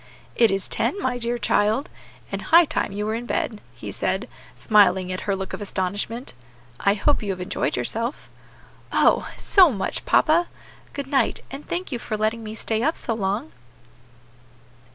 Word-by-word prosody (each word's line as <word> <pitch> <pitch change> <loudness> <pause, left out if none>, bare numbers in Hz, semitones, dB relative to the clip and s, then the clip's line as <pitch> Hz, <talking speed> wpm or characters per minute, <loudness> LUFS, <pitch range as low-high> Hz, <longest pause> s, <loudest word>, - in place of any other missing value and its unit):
"It 230 -2 +5
is 195 0 -2
ten, 405 - -1
my 255 -8 -1
dear 240 0 -1
child, 220 +3 +1 0.4
and - - -3
high 340 0 +6
time 310 - -1
you 205 +1 -3
were 215 - -1
in 235 +2 -4
bed," 215 -3 -2
he - - -7
said, - - -2 0.3
smiling 195 -4 +4
at 185 - -3
her 200 - +2
look 190 0 -5
of - - -5
astonishment. 205 +5 -3 0.5
"I 200 0 +3
hope 290 +8 +2
you 210 - -4
have 185 -1 -2
enjoyed 180 - -1
yourself." 230 - -2 0.6
"Oh! - - +3
so 370 -6 +5
much, 195 -5 -2
papa. 335 +3 +4 0.5
Good 280 - -4
night, 270 0 +1
and 275 +2 -8
thank 355 0 -3
you 245 - -2
for 215 - -4
letting 220 +2 -1
me 215 0 -6
stay 220 0 -1
up 315 +6 +1
so 230 - -2
long." 210 +7 -2
225 Hz, 175 wpm, -23 LUFS, 200-270 Hz, 0.6 s, high